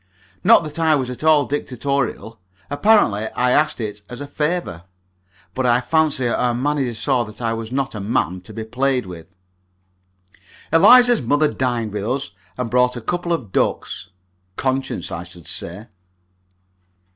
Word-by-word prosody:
Not -, -, +6 dB
that 155 Hz, +1 st, -6 dB
I 160 Hz, -1 st, +4 dB
was 130 Hz, -3 st, -2 dB
at 125 Hz, -, -8 dB
all 155 Hz, -3 st, +5 dB
dictatorial 130 Hz, -4 st, -3 dB, 0.3 s
apparently 145 Hz, -, +3 dB
I 125 Hz, 0 st, +2 dB
asked 150 Hz, +1 st, +2 dB
it 105 Hz, -2 st, -5 dB
as 125 Hz, 0 st, -8 dB
a 145 Hz, -, -5 dB
favour. 150 Hz, -, -3 dB, 0.7 s
But 130 Hz, -1 st, 0 dB
I 120 Hz, 0 st, +4 dB
fancy 150 Hz, -2 st, +1 dB
our 120 Hz, 0 st, 0 dB
manager 135 Hz, -2 st, -1 dB
saw 125 Hz, +2 st, +1 dB
that 105 Hz, 0 st, -12 dB
I 115 Hz, -2 st, -1 dB
was 115 Hz, 0 st, -5 dB
not 135 Hz, +1 st, -2 dB
a 110 Hz, -, -5 dB
man 95 Hz, -3 st, -1 dB
to -, -, -11 dB
be 110 Hz, -, -6 dB
played 125 Hz, +2 st, 0 dB
with. 85 Hz, -3 st, -10 dB, 1.4 s
Eliza's 240 Hz, +7 st, +7 dB
mother 145 Hz, +5 st, +1 dB
dined 120 Hz, -5 st, -1 dB
with 105 Hz, -1 st, -3 dB
us, 130 Hz, +5 st, -2 dB, 0.3 s
and 125 Hz, -2 st, -3 dB
brought 125 Hz, 0 st, +2 dB
a -, -, -3 dB
couple 175 Hz, +8 st, -3 dB
of 130 Hz, -, -2 dB
ducks. 95 Hz, 0 st, -1 dB, 0.5 s
Conscience, 130 Hz, -9 st, -2 dB
I 85 Hz, +1 st, -4 dB
should 85 Hz, -2 st, -14 dB
say. 90 Hz, +6 st, -7 dB
125 Hz, 155 wpm, -20 LUFS, 110-145 Hz, 1.4 s, Eliza's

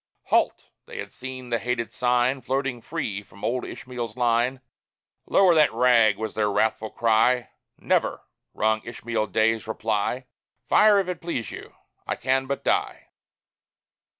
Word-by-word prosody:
"Halt!" -, -, +1 dB, 0.2 s
They -, -, -9 dB
had -, -, -7 dB
seen 130 Hz, -1 st, -8 dB
the 115 Hz, -, +1 dB
hated 120 Hz, -1 st, -2 dB
sign 125 Hz, +2 st, +1 dB
Floating 130 Hz, -1 st, -2 dB
free 115 Hz, -9 st, -4 dB
from 100 Hz, -1 st, -18 dB
old 125 Hz, +2 st, -1 dB
Ishmael's 120 Hz, -3 st, -6 dB
line 120 Hz, +2 st, +1 dB, 0.7 s
"Lower 190 Hz, -3 st, +5 dB
that 155 Hz, -2 st, +5 dB
rag!" 115 Hz, -4 st, +4 dB
was 110 Hz, 0 st, -4 dB
their 105 Hz, -1 st, 0 dB
wrathful 110 Hz, +1 st, 0 dB
cry; 115 Hz, +3 st, +2 dB, 0.3 s
"Never!" -, -, 0 dB, 0.3 s
rung 110 Hz, 0 st, +1 dB
Ishmael 115 Hz, -1 st, -3 dB
Day's 110 Hz, 0 st, +1 dB
reply, 110 Hz, +3 st, -1 dB, 0.4 s
"Fire 210 Hz, -1 st, +6 dB
if 195 Hz, -2 st, +1 dB
it 180 Hz, -1 st, -4 dB
please 165 Hz, -9 st, -4 dB
you -, -, -10 dB, 0.3 s
I -, -, -1 dB
can 130 Hz, 0 st, 0 dB
but 140 Hz, 0 st, -3 dB
die." -, -, -1 dB
120 Hz, 145 wpm, -25 LUFS, 110-130 Hz, 0.7 s, Fire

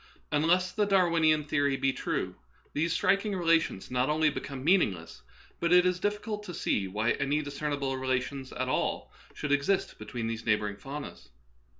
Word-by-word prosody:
Unless 175 Hz, +5 st, +2 dB
the 210 Hz, +1 st, 0 dB
Darwinian 165 Hz, -5 st, +3 dB
theory 145 Hz, -2 st, +1 dB
be 135 Hz, 0 st, +1 dB
true, -, -, -2 dB, 0.4 s
these 165 Hz, +3 st, 0 dB
striking 200 Hz, +4 st, +1 dB
relations 165 Hz, -, +1 dB
not 125 Hz, +2 st, +1 dB
only 155 Hz, 0 st, +3 dB
become 135 Hz, -2 st, -6 dB
meaningless, 110 Hz, -, +1 dB, 0.4 s
but 170 Hz, -, 0 dB
it 180 Hz, 0 st, +7 dB
is 180 Hz, 0 st, +1 dB
difiicult 210 Hz, +2 st, -2 dB
to 180 Hz, -5 st, -8 dB
see 100 Hz, -9 st, 0 dB
why 110 Hz, +5 st, 0 dB
any 145 Hz, +2 st, 0 dB
discernible 140 Hz, -1 st, -2 dB
relations 130 Hz, +1 st, -2 dB
at 130 Hz, +1 st, -3 dB
all 130 Hz, -, -1 dB, 0.2 s
should 150 Hz, -, -3 dB
exist 145 Hz, +7 st, +1 dB
between 115 Hz, +2 st, -5 dB
these 115 Hz, 0 st, -3 dB
neighboring 105 Hz, -2 st, 0 dB
faunas. 140 Hz, -, -8 dB
145 Hz, 160 wpm, -29 LUFS, 130-175 Hz, 0.4 s, it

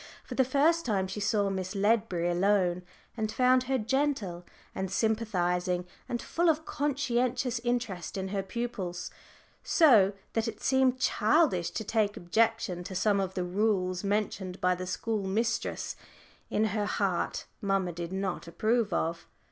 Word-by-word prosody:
For -, -, -8 dB
the 265 Hz, -, +3 dB
first 295 Hz, +6 st, +3 dB
time 200 Hz, -5 st, 0 dB
she 190 Hz, +2 st, -5 dB
saw 205 Hz, -1 st, +1 dB
Miss 185 Hz, 0 st, -4 dB
Ledbury 195 Hz, -4 st, +1 dB
alone, 180 Hz, -1 st, +2 dB, 0.3 s
and 215 Hz, -2 st, -2 dB
found 255 Hz, +1 st, +3 dB
her 265 Hz, +1 st, +1 dB
gentle 235 Hz, -7 st, -1 dB, 0.3 s
and 190 Hz, -1 st, -3 dB
sympathising, 180 Hz, -5 st, 0 dB, 0.2 s
and 240 Hz, -, -1 dB
full 340 Hz, +6 st, +1 dB
of 315 Hz, 0 st, +1 dB
conscientious 255 Hz, -3 st, 0 dB
interest 230 Hz, -8 st, -2 dB
in 190 Hz, 0 st, -3 dB
her 195 Hz, 0 st, -1 dB
pupils, 190 Hz, -4 st, -4 dB, 0.5 s
so 225 Hz, -, +5 dB, 0.2 s
that 225 Hz, 0 st, 0 dB
it 225 Hz, -2 st, -5 dB
seemed 265 Hz, -1 st, +2 dB
childish 220 Hz, -, +2 dB
to 220 Hz, -, -4 dB
take 210 Hz, -1 st, 0 dB
objection 220 Hz, -1 st, 0 dB
to 190 Hz, -, -6 dB
some 200 Hz, +1 st, +2 dB
of 190 Hz, -1 st, -2 dB
the 180 Hz, -, -1 dB
rules 185 Hz, -1 st, 0 dB
mentioned 200 Hz, -2 st, -2 dB
by 180 Hz, 0 st, +3 dB
the 180 Hz, 0 st, -5 dB
school 210 Hz, +1 st, -2 dB
mistress 225 Hz, +4 st, -1 dB, 0.5 s
which -, -, -2 dB
in 215 Hz, -, +3 dB
her 210 Hz, -2 st, 0 dB
heart 195 Hz, -4 st, -1 dB, 0.2 s
mamma 195 Hz, -3 st, 0 dB
did 170 Hz, +1 st, -6 dB
not 190 Hz, -2 st, -3 dB
approve 215 Hz, +4 st, +1 dB
of. 165 Hz, 0 st, -2 dB
205 Hz, 155 wpm, -29 LUFS, 185-240 Hz, 0.5 s, so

